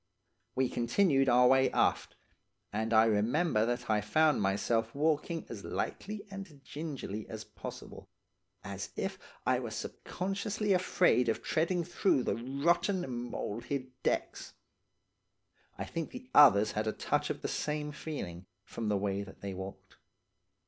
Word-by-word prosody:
"We 130 Hz, 0 st, +2 dB
continued 135 Hz, +3 st, +2 dB
our 125 Hz, +1 st, +6 dB
way 130 Hz, +1 st, +5 dB
aft, -, -, +1 dB, 0.6 s
and 110 Hz, +2 st, -1 dB
I 110 Hz, 0 st, +6 dB
remember 115 Hz, +3 st, +2 dB
that 120 Hz, 0 st, -2 dB
I 105 Hz, -1 st, +2 dB
found 150 Hz, +7 st, +3 dB
myself 115 Hz, +4 st, 0 dB
walking 155 Hz, +2 st, 0 dB
as 105 Hz, -4 st, -8 dB
lightly 210 Hz, +1 st, -4 dB
and 195 Hz, -7 st, -8 dB
gingerly 140 Hz, -9 st, -5 dB
as 110 Hz, -1 st, -6 dB
possible, -, -, -9 dB, 0.5 s
as -, -, -5 dB
if -, -, -3 dB, 0.3 s
I -, -, +3 dB
were -, -, -4 dB
subconsciously 200 Hz, +2 st, -2 dB
afraid 180 Hz, -8 st, +3 dB
of 115 Hz, -, -1 dB
treading 170 Hz, +2 st, +1 dB
through 175 Hz, -5 st, +2 dB
the -, -, 0 dB
rotten, 140 Hz, -, 0 dB
mould 115 Hz, +3 st, -4 dB
hid 130 Hz, 0 st, -3 dB
decks. -, -, -2 dB, 1.2 s
I -, -, -3 dB
think 165 Hz, -2 st, -4 dB
the 255 Hz, 0 st, -10 dB
others 110 Hz, -8 st, +7 dB
had 110 Hz, +1 st, -2 dB
a 110 Hz, -, 0 dB
touch -, -, 0 dB
of -, -, -4 dB
the -, -, 0 dB
same 150 Hz, 0 st, -2 dB
feeling, 95 Hz, -, -6 dB, 0.2 s
from 110 Hz, +2 st, -4 dB
the 105 Hz, -, +2 dB
way 100 Hz, 0 st, -1 dB
that 100 Hz, -1 st, -10 dB
they 100 Hz, -1 st, -4 dB
walked. 95 Hz, +1 st, -9 dB
130 Hz, 145 wpm, -32 LUFS, 110-165 Hz, 1.2 s, others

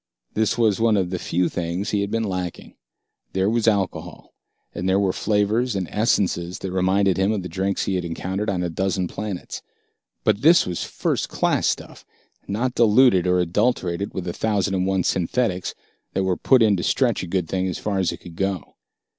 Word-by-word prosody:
This 110 Hz, 0 st, +1 dB
was 110 Hz, -4 st, +2 dB
one 110 Hz, -2 st, +3 dB
of 90 Hz, -2 st, 0 dB
the 90 Hz, -, -2 dB
few 90 Hz, +1 st, 0 dB
things 85 Hz, +5 st, -3 dB
he 105 Hz, -, +1 dB
had 100 Hz, -, -2 dB
been 115 Hz, +1 st, -1 dB
lacking. 90 Hz, -4 st, -4 dB, 0.6 s
There 95 Hz, 0 st, +1 dB
was 115 Hz, -1 st, +1 dB
alcohol, 100 Hz, -4 st, -1 dB, 0.4 s
and 90 Hz, +2 st, -2 dB
there 95 Hz, +1 st, +3 dB
were 95 Hz, -2 st, +1 dB
flavors 110 Hz, +3 st, +1 dB
and 95 Hz, -3 st, -2 dB
essences 90 Hz, -4 st, 0 dB
that 95 Hz, -, -5 dB
reminded 95 Hz, +1 st, +2 dB
him 95 Hz, +2 st, +2 dB
of 105 Hz, -4 st, -2 dB
the -, -, -4 dB
drinks 95 Hz, +1 st, -1 dB
he 95 Hz, -, -1 dB
had 90 Hz, -1 st, -1 dB
encountered 95 Hz, +5 st, -3 dB
on 90 Hz, -3 st, -1 dB
a 90 Hz, -, -1 dB
dozen 95 Hz, +1 st, -1 dB
planets. 100 Hz, -1 st, -6 dB, 0.6 s
But 105 Hz, 0 st, +2 dB
this 165 Hz, +5 st, +6 dB
was 90 Hz, -2 st, -3 dB
first -, -, -2 dB
class -, -, +1 dB
stuff, -, -, -3 dB, 0.4 s
not 120 Hz, +5 st, -1 dB
diluted 115 Hz, -5 st, +4 dB
or 90 Hz, 0 st, +3 dB
adulterated 90 Hz, 0 st, 0 dB
with 95 Hz, -, -3 dB
the 85 Hz, -1 st, -4 dB
thousand 100 Hz, -2 st, 0 dB
and 95 Hz, 0 st, 0 dB
one 95 Hz, -1 st, +1 dB
synthetics 95 Hz, +2 st, -1 dB, 0.4 s
that 95 Hz, -, 0 dB
were 95 Hz, -1 st, +1 dB
put 130 Hz, +3 st, +4 dB
in 105 Hz, -2 st, +4 dB
to -, -, -2 dB
stretch 125 Hz, -5 st, +1 dB
a 90 Hz, -, -5 dB
good 90 Hz, -1 st, -1 dB
thing 95 Hz, +1 st, -1 dB
as 90 Hz, -, -3 dB
far 100 Hz, -2 st, -2 dB
as 90 Hz, -3 st, +1 dB
it -, -, -6 dB
could 85 Hz, -2 st, -11 dB
go. 95 Hz, -3 st, -3 dB
95 Hz, 200 wpm, -23 LUFS, 90-105 Hz, 0.6 s, this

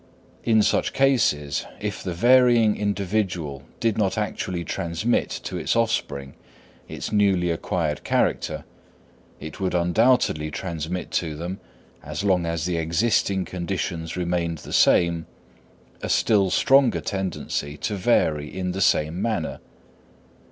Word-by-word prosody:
In 110 Hz, -2 st, +4 dB
such -, -, +1 dB
cases, 115 Hz, -, +2 dB, 0.2 s
if -, -, -4 dB
the 90 Hz, -, -4 dB
varying 120 Hz, 0 st, +5 dB
individual 95 Hz, -8 st, -2 dB, 0.2 s
did 115 Hz, -2 st, 0 dB
not 100 Hz, -1 st, +1 dB
actually 90 Hz, -4 st, -2 dB
transmit 85 Hz, +7 st, -1 dB
to -, -, -4 dB
its -, -, -1 dB
offspring 110 Hz, -12 st, -1 dB, 0.5 s
its -, -, -6 dB
newly 95 Hz, -4 st, +2 dB
acquired 80 Hz, -2 st, -2 dB
character, -, -, 0 dB, 0.7 s
it 80 Hz, +1 st, -8 dB
would 95 Hz, -2 st, -1 dB
undoubtedly 90 Hz, -3 st, +2 dB
transmit 85 Hz, +1 st, -4 dB
to 80 Hz, -3 st, -1 dB
them, 90 Hz, +5 st, -5 dB, 0.4 s
as 75 Hz, +6 st, -5 dB
long 90 Hz, -4 st, +2 dB
as 85 Hz, -1 st, -2 dB
the 90 Hz, -2 st, -1 dB
existing 95 Hz, +3 st, +1 dB
conditions 85 Hz, -2 st, -4 dB
remained 85 Hz, -2 st, -1 dB
the -, -, -9 dB
same, 85 Hz, -1 st, +3 dB, 0.7 s
a -, -, -4 dB
still 100 Hz, -4 st, +3 dB
stronger 130 Hz, -4 st, +4 dB
tendency 80 Hz, -5 st, -3 dB
to 105 Hz, -, -3 dB
vary 80 Hz, -7 st, +1 dB
in 90 Hz, -1 st, -3 dB
the 95 Hz, +2 st, -4 dB
same 80 Hz, 0 st, +2 dB
manner. 110 Hz, -9 st, -2 dB
90 Hz, 125 wpm, -24 LUFS, 80-105 Hz, 0.7 s, varying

